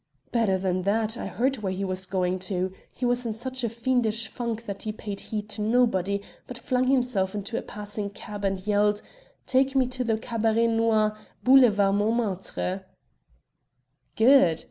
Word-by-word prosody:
"Better 220 Hz, -5 st, +2 dB
than 185 Hz, -1 st, -1 dB
that, 215 Hz, +3 st, 0 dB
I -, -, -5 dB
heard 265 Hz, +3 st, 0 dB
where 200 Hz, -4 st, -3 dB
he 190 Hz, +1 st, -2 dB
was 185 Hz, 0 st, -3 dB
going 185 Hz, -1 st, 0 dB
to. 185 Hz, -1 st, -1 dB, 0.2 s
He 250 Hz, -, -4 dB
was 245 Hz, 0 st, +1 dB
in 225 Hz, -3 st, -3 dB
such 255 Hz, +2 st, -4 dB
a 235 Hz, -, +1 dB
fiendish 230 Hz, -1 st, 0 dB
funk 235 Hz, -1 st, -4 dB
that 200 Hz, -2 st, -5 dB
he 215 Hz, -, -3 dB
paid 205 Hz, -2 st, -6 dB
heed 210 Hz, -1 st, -4 dB
to 215 Hz, -, -1 dB
nobody, 205 Hz, -4 st, +1 dB, 0.2 s
but 250 Hz, -, -7 dB
flung 255 Hz, +1 st, 0 dB
himself 245 Hz, -7 st, +1 dB
into 205 Hz, +3 st, -4 dB
a -, -, -1 dB
passing 205 Hz, 0 st, -5 dB
cab 205 Hz, 0 st, -8 dB
and 195 Hz, -1 st, -1 dB
yelled, 210 Hz, 0 st, +2 dB, 0.4 s
'Take 265 Hz, +1 st, +2 dB
me 265 Hz, -1 st, +4 dB
to 250 Hz, 0 st, -2 dB
the 225 Hz, -2 st, +1 dB
Cabaret 225 Hz, 0 st, +1 dB
Noir, 225 Hz, -2 st, +2 dB, 0.3 s
Boulevard 225 Hz, -7 st, +5 dB
Montmartre.'" 200 Hz, -3 st, -1 dB, 1.3 s
"Good. 220 Hz, -, +5 dB
215 Hz, 165 wpm, -26 LUFS, 200-240 Hz, 1.3 s, Boulevard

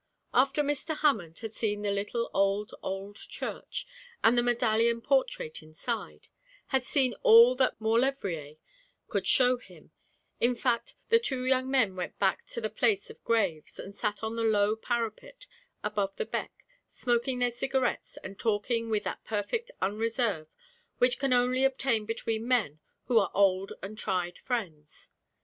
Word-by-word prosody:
After 275 Hz, +4 st, +3 dB
Mr. 290 Hz, +2 st, -2 dB
Hammond 200 Hz, -, +1 dB
had 220 Hz, -, -6 dB
seen 210 Hz, -2 st, -1 dB
the 205 Hz, -, 0 dB
little 205 Hz, +4 st, -2 dB
old, 200 Hz, +1 st, +1 dB
old 195 Hz, +2 st, -5 dB
church, -, -, -6 dB, 0.4 s
and 225 Hz, +2 st, +6 dB
the 240 Hz, -, +4 dB
medallion 235 Hz, -1 st, +2 dB
portrait 260 Hz, -, 0 dB
inside, 160 Hz, +10 st, -6 dB, 0.4 s
had 265 Hz, -2 st, +1 dB
seen 255 Hz, -1 st, +2 dB
all 235 Hz, +3 st, +8 dB
that 260 Hz, -1 st, +1 dB
Maulevrier 220 Hz, -, 0 dB, 0.5 s
could -, -, -1 dB
show 250 Hz, -1 st, +4 dB
him, 245 Hz, -, -17 dB, 0.5 s
in 245 Hz, +1 st, +2 dB
fact, 240 Hz, -1 st, -1 dB
the 460 Hz, 0 st, +6 dB
two 265 Hz, -, -2 dB
young 260 Hz, 0 st, +2 dB
men 250 Hz, -8 st, +2 dB
went 180 Hz, -1 st, -5 dB
back 190 Hz, -1 st, 0 dB
to -, -, -2 dB
the 215 Hz, -2 st, -2 dB
place 215 Hz, -2 st, +1 dB
of -, -, -17 dB
graves, 195 Hz, -10 st, 0 dB
and 195 Hz, -, -8 dB
sat 210 Hz, +1 st, -3 dB
on 220 Hz, +1 st, -2 dB
the 230 Hz, -, -2 dB
low 210 Hz, -1 st, +3 dB
parapet 240 Hz, -, -4 dB, 0.4 s
above 205 Hz, -2 st, -1 dB
the -, -, -2 dB
beck, -, -, -5 dB, 0.2 s
smoking 245 Hz, +1 st, 0 dB
their 245 Hz, 0 st, +1 dB
cigarettes, 260 Hz, +1 st, -1 dB
and 195 Hz, +1 st, -8 dB
talking 230 Hz, +1 st, 0 dB
with 215 Hz, -2 st, 0 dB
that -, -, -5 dB
perfect 225 Hz, -, -2 dB
unreserve 215 Hz, -4 st, 0 dB, 0.5 s
which 250 Hz, 0 st, +3 dB
can 275 Hz, -1 st, 0 dB
only 250 Hz, +1 st, +3 dB
obtain 265 Hz, -5 st, +1 dB
between 225 Hz, 0 st, -2 dB
men 220 Hz, -, +1 dB, 0.2 s
who 235 Hz, -2 st, +4 dB
are 200 Hz, -, +1 dB
old 195 Hz, -1 st, +3 dB
and 215 Hz, +3 st, -7 dB
tried 180 Hz, -3 st, -2 dB
friends. 170 Hz, -, -5 dB
230 Hz, 155 wpm, -29 LUFS, 205-250 Hz, 0.5 s, all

